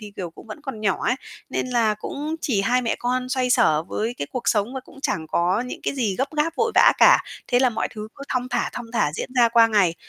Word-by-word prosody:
thì, 210 Hz, -2 st, -10 dB
kiểu, 175 Hz, -3 st, -5 dB
cũng 170 Hz, -, -15 dB
vẫn 215 Hz, -, -8 dB
còn 270 Hz, -7 st, -6 dB
nhỏ 200 Hz, -3 st, +1 dB
ấy, 250 Hz, -, +1 dB, 0.3 s
nên -, -, -1 dB
là 230 Hz, -4 st, +2 dB
cũng 295 Hz, +9 st, -5 dB
chỉ 220 Hz, -9 st, 0 dB
hai 250 Hz, +4 st, +2 dB
mẹ 230 Hz, -, -1 dB
con 250 Hz, +1 st, -1 dB
xoay 255 Hz, -1 st, 0 dB
xở 160 Hz, -12 st, +4 dB
với 220 Hz, +7 st, -3 dB
cái 140 Hz, -, -3 dB
cuộc 250 Hz, -, -2 dB
sống 215 Hz, +4 st, +1 dB
và 265 Hz, -, -3 dB
cũng -, -, -19 dB
chẳng 160 Hz, -1 st, -1 dB
có 180 Hz, +7 st, +1 dB
những -, -, -7 dB
cái -, -, -2 dB
gì 225 Hz, -7 st, 0 dB
gấp 270 Hz, +3 st, -1 dB
gáp, 320 Hz, +2 st, 0 dB
vội 455 Hz, -1 st, +1 dB
vã -, -, +7 dB
cả. -, -, +7 dB, 0.3 s
Thế 245 Hz, -, +3 dB
là 255 Hz, -1 st, +3 dB
mọi 225 Hz, -, -2 dB
thứ 215 Hz, 0 st, -7 dB
cứ 280 Hz, -, -11 dB
thong 255 Hz, 0 st, -1 dB
thả, 240 Hz, -1 st, -1 dB
thong 240 Hz, -, -6 dB
thả 150 Hz, -10 st, +1 dB
diễn -, -, -4 dB
ra 235 Hz, -2 st, +6 dB
qua 230 Hz, -1 st, +6 dB
ngày. 200 Hz, -7 st, +2 dB
235 Hz, 270 wpm, -23 LUFS, 210-255 Hz, 0.3 s, vã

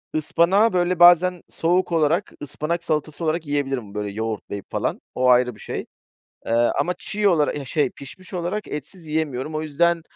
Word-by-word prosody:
ıspanağı, 180 Hz, +8 st, +3 dB
böyle, 180 Hz, -1 st, +1 dB
bazen, 175 Hz, 0 st, +6 dB
soğuk 175 Hz, +2 st, +1 dB
olarak, 165 Hz, +3 st, +1 dB
ıspanak 160 Hz, +4 st, -3 dB
salatası 155 Hz, +1 st, -2 dB
olarak 160 Hz, 0 st, -1 dB
yiyebilirim, 135 Hz, -7 st, -2 dB
böyle 105 Hz, 0 st, -3 dB
yoğurtlayıp 110 Hz, -1 st, -4 dB
falan, -, -, -2 dB
o 125 Hz, 0 st, +3 dB
ayrı 125 Hz, -1 st, +4 dB
bir -, -, -18 dB
şey. -, -, -5 dB, 0.6 s
Eee, -, -, -2 dB
ama 135 Hz, +9 st, +2 dB
çiğ 205 Hz, +1 st, 0 dB
olarak, 155 Hz, -6 st, +2 dB
eh, 140 Hz, -, -6 dB
şey, 140 Hz, 0 st, 0 dB
pişmiş 185 Hz, +7 st, -11 dB
olarak 180 Hz, +4 st, -3 dB
etsiz 155 Hz, +4 st, -7 dB
yiyemiyorum. 150 Hz, -2 st, -2 dB
O 155 Hz, -, -2 dB
yüzden, 170 Hz, +3 st, +1 dB
155 Hz, 165 wpm, -23 LUFS, 135-175 Hz, 0.6 s, bazen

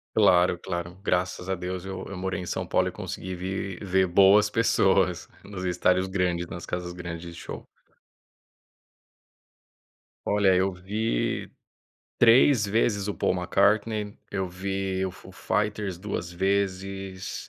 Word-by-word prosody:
Claro, 90 Hz, 0 st, +4 dB
claro. 85 Hz, 0 st, -5 dB
Graças 90 Hz, 0 st, -1 dB
a 95 Hz, -, +1 dB
Deus 90 Hz, 0 st, -5 dB
eu 95 Hz, -1 st, -5 dB
eu 100 Hz, -, -7 dB
morei 95 Hz, 0 st, -3 dB
em 90 Hz, -, -6 dB
São -, -, -3 dB
Paulo -, -, +2 dB
e -, -, -3 dB
consegui 95 Hz, 0 st, -6 dB
vir 95 Hz, +1 st, -4 dB
ver 95 Hz, -1 st, +2 dB
boas 100 Hz, +3 st, +6 dB
pessoas, 95 Hz, -5 st, +2 dB, 0.2 s
nos 95 Hz, -2 st, -7 dB
estádios 90 Hz, +1 st, +2 dB
grandes, 90 Hz, -2 st, -1 dB
nas 85 Hz, -, -7 dB
casas 90 Hz, 0 st, -4 dB
grandes 85 Hz, -1 st, -6 dB
de 85 Hz, -, -10 dB
show. -, -, -7 dB, 2.6 s
Olha, 100 Hz, -2 st, +3 dB
eu 95 Hz, +1 st, +2 dB
vi 95 Hz, -, -2 dB, 0.7 s
3 120 Hz, 0 st, +6 dB
vezes 105 Hz, -1 st, +1 dB
o 105 Hz, -, -2 dB
Paul -, -, +1 dB
McCartney, 105 Hz, +3 st, +1 dB
eu 95 Hz, -1 st, -1 dB
vi 95 Hz, +1 st, -2 dB
o -, -, -4 dB
Foo 95 Hz, 0 st, -14 dB
Fighters 105 Hz, 0 st, -2 dB
2 90 Hz, -2 st, -5 dB
vezes. 95 Hz, 0 st, -2 dB
95 Hz, 135 wpm, -26 LUFS, 90-100 Hz, 2.6 s, boas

